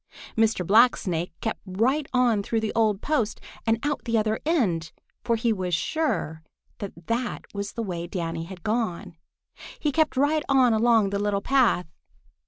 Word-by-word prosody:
Mr. 220 -5 +2
Blacksnake 195 -5 +3
kept 225 - -2
right 245 +10 0
on 245 -5 +3
through 225 +3 -1
the 220 -1 -2
old 215 -3 +1
post 275 -8 0 0.3
and 225 0 +3
out 290 -1 -1
the 230 -2 +1
other 215 0 0
end, 180 - +1 0.3
for 235 -1 +1
he 230 0 +1
was 180 -4 -1
sure 205 - -1 0.4
that 180 -4 -8
that 240 +4 -2
was 200 0 -4
the 230 - -3
way 175 -4 -4
Danny 165 -2 -3
had 180 -1 -10
gone. 210 -7 -2 0.6
He 300 - 0
kept 310 -2 +1
right 295 +3 +3
on 260 -4 +5
along 220 -2 +3
the 200 - -1
little 205 -1 0
path. 250 -9 +3
220 Hz, 165 wpm, -25 LUFS, 185-245 Hz, 0.6 s, on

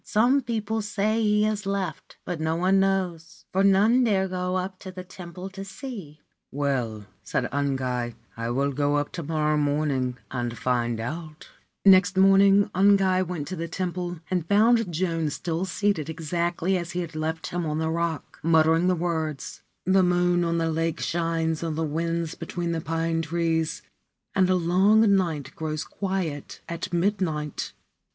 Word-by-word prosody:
Some 245 +6 +3
people 220 -2 -2
say 210 +1 0
he 210 -1 +3
has 215 -2 -1
left; 195 -4 -3
but 170 -3 -4
no 160 0 0
one 185 +3 +3
knows, 185 -4 -1
for 190 +1 +3
none 205 +6 +5
dare 195 -5 +2
go 180 0 -2
up 185 0 -3
to 190 - -8
the 185 0 -8
temple 180 0 -9
to 195 0 -7
see/ 195 - -8 0.3
4 140 - -8
Well/ 120 -7 -1 0.2
said - - -1
Ungai, 130 -4 -1
c - - -25 0.2
I 115 0 -3
will 140 +4 +1
go 145 +1 +1
up 145 0 -1
to 175 - -5
morrow 155 -1 0
morning 145 -4 0
and 120 -2 -3
find 120 0 0
out/ 155 +5 -6 0.4
Next 185 -1 +6
morning 195 +1 +5
Ungai 190 -1 +4
went 165 -5 -4
to 185 - -3
the 170 -1 -4
temple, 175 -1 -4
and 180 -3 0
found 220 0 +4
Joan 165 -2 0
still 165 +4 -2
seated 190 -5 0
exactly 170 +3 -1
as 170 0 -6
he 180 - -1
had 170 -2 -6
left 160 +1 -3
him 175 -2 -2
on 150 0 -1
the 160 0 0
rock 170 -1 -3
muttering 160 +1 +4
the 185 - +3
words: 160 -4 -3 0.2
c 185 - +1
The 190 0 +6
moon 175 -1 +2
on 170 0 0
the 165 -1 0
lake 165 0 -1
shines 165 -1 -1
on 165 -2 -2
the 160 - -1
winds 165 +1 -1
between 170 -1 -4
the 165 -1 -2
fine 165 +1 -1
trees, 165 0 -1 0.5
and 185 -1 +3
a 185 - +4
long 200 +5 +4
night 165 -7 -1
grows 155 -1 -3
quiet 185 -7 -4
at 170 -1 -5
midnight 170 -5 -1
170 Hz, 175 wpm, -26 LUFS, 155-190 Hz, 0.5 s, Next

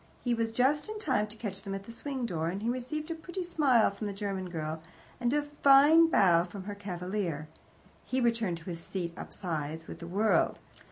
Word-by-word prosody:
He 245 - +1
was 230 -1 0
just 270 - +2
in 430 - -4
time 260 - +1
to 215 +1 -11
catch 200 -4 -5
them 195 -1 -4
at 195 - -6
the 230 - -10
swing 260 +1 -4
door, 165 -6 -1
and 195 +4 -4
he 235 - +1
received 300 +6 -4
a - - +1
pretty 345 +3 -5
smile 285 - +3
from 205 +2 -5
the 200 - -3
German 195 -2 -3
girl 160 -1 -4 0.4
and 240 -1 +1
a 295 +1 +2
fine 290 +2 +6
bow 170 - +5
from 185 +2 -8
her 205 +2 -5
cavalier. 180 -5 -3 0.6
He 260 - -1
returned 230 -7 +1
to 165 +2 -9
his 165 - -5
seat 170 0 -4
up - - -8
sides 160 -3 -4
with - - -8
the 170 - -7
world. 205 +5 +2
210 Hz, 215 wpm, -30 LUFS, 180-260 Hz, 0.6 s, fine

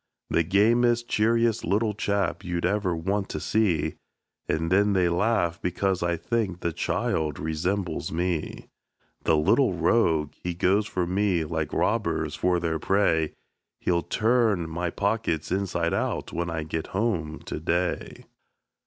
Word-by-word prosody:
The 80 - +3
gamest, 120 +7 +3
cheeriest 115 +1 +2
little 105 +4 +1
chap, 100 -5 -1
you'd 85 -1 -2
ever 95 -2 0
want 95 +4 -1
to - - -3
see! 100 -8 0 0.5
And 80 +2 0
then 100 +2 +4
they 90 -2 +3
laugh, 85 -2 +1
because 95 +1 0
I 85 -1 0
think 100 -2 -2
the 85 - -1
child 75 -1 -1
resembles 90 +4 -2
me. 85 -1 -2 0.6
The 80 - +4
little 90 - +3
rogue! 80 -4 +2
he 90 -1 -3
goes 100 +4 +2
for 90 -1 -1
me, 90 -2 +1
like 80 -1 -3
robbers 80 -8 0
for 90 -1 +1
their 80 -2 -1
prey; 80 -4 +1 0.5
He'll 85 -1 +1
turn 110 -5 +1
my 85 +2 -2
pockets 100 -6 -1
inside 90 -3 0
out, - - -2
when 85 0 -2
I 80 -1 -3
get 80 +1 -4
home 85 -8 -1
to - - -5
day. 85 +2 -2
90 Hz, 145 wpm, -26 LUFS, 80-105 Hz, 0.6 s, then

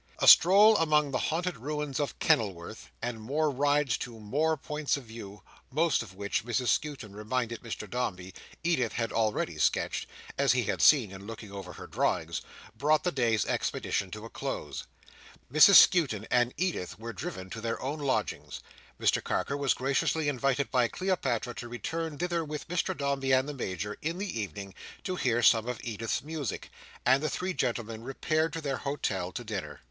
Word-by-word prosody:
A - - +1
stroll 205 +5 +8
among 150 -4 +2
the 130 - 0
haunted 175 +6 -1
ruins 145 +2 -3
of 145 -4 -2
Kenilworth, 95 -7 0
and 120 -2 -3
more 150 +7 0
rides 145 -1 +1
to 115 -2 -7
more 150 +9 0
points 150 +1 -2
of 140 - -8
view: 105 -4 -10 0.3
most 155 +2 +2
of 100 -5 -10
which, 100 +1 -2
Mrs 120 +1 0
Skewton 130 -9 -1
reminded 115 +2 -2
Mr 110 -2 -6
Dombey, 95 -6 -3 0.3
Edith 165 -9 +1
had 115 -1 -2
already 105 -7 0
sketched, - - +1 0.3
as - - +4
he - - +1
had - - -2
seen 125 -10 +6
in 95 +1 -10
looking 110 -2 -8
over 95 -2 -7
her - - -9
drawings: - - -1 0.3
brought 150 +6 +2
the 180 - +1
day's 115 - +1
expedition - - -1
to - - -8
a - - -8
close. - - -5 0.7
Mrs 155 +6 +8
Skewton 135 - +6
and 120 0 +2
Edith 175 - -2
were 115 +2 -7
driven 95 -1 -6
to 115 - -6
their 115 0 -2
own 145 +4 -3
lodgings; 140 -3 -2 0.4
Mr - - +2
Carker 140 - -1
was 140 -2 +1
graciously 140 +4 0
invited 140 0 0
by 125 -2 +3
Cleopatra 130 - -1
to 115 +1 -7
return 160 +5 -4
thither 175 0 -1
with 150 -1 -6
Mr 180 +1 -1
Dombey 140 -2 0
and 130 +1 +3
the 150 - -4
Major, 105 - -4
in 165 +3 -2
the 195 - -3
evening, 100 0 -6 0.3
to 185 - -2
hear 120 -7 +1
some 115 +1 +5
of 125 -2 -3
Edith's 115 0 -2
music; 150 -6 -5 0.3
and 130 +2 +5
the 155 - 0
three 185 +1 -2
gentlemen 115 -5 -2
repaired 155 +5 0
to 165 - -4
their 140 -3 -2
hotel 100 -10 -2
to 120 - -6
dinner. 95 -10 -5
130 Hz, 180 wpm, -29 LUFS, 110-150 Hz, 0.7 s, stroll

